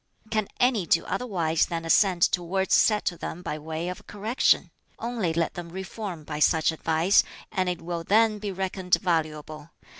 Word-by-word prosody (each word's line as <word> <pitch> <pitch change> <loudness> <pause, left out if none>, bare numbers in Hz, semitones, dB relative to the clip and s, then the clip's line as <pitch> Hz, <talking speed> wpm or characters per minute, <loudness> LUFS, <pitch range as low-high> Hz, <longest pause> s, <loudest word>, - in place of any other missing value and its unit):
"Can 215 -2 0
any 240 -8 +2
do 165 - +3
otherwise 170 -10 0
than 165 -1 -4
assent 180 +1 +3
to 180 - 0
words 190 +2 -1
said 210 -1 +4
to 175 - -1
them 180 - -6
by 155 - -4
way 160 +2 -4
of 180 0 -7
correction? 215 +5 +1 0.3
Only 230 -7 -2
let 165 0 -1
them 175 -1 -7
reform 190 -1 -6
by 150 0 -5
such 160 +1 +3
advice, 160 +4 +3 0.3
and 185 -1 0
it 180 - -4
will 170 0 -4
then 215 +3 +3
be 205 -1 -4
reckoned 190 -1 0
valuable. 155 -3 -2
180 Hz, 175 wpm, -26 LUFS, 165-200 Hz, 0.3 s, said